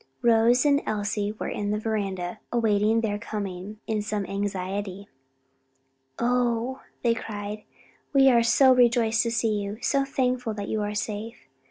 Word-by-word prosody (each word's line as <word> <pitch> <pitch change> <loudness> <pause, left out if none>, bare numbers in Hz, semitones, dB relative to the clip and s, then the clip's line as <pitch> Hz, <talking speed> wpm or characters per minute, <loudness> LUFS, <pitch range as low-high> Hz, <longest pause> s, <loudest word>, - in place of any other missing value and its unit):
Rose 235 +2 +4
and 285 0 +4
Elsie 205 0 -1
were 220 - -5
in 205 0 -3
the 210 - 0
veranda 195 -5 -3
awaiting 220 -1 +2
their 205 -2 -1
coming 205 -2 -6
in 215 -2 -1
some 210 -1 -2
anxiety. 195 0 -4 1.1
"Oh," 245 +1 0 0.2
they 235 -1 +4
cried, 210 -1 -6 0.5
"we 270 -2 +5
are 240 -3 +6
so 255 +3 +5
rejoiced 235 -2 +3
to 230 - -1
see 220 -2 +1
you! 200 +1 -4
so 275 +2 +1
thankful 255 -4 -1
that 205 -1 -5
you 215 - -1
are 210 0 -3
safe. 210 - -5
220 Hz, 150 wpm, -26 LUFS, 205-235 Hz, 1.1 s, are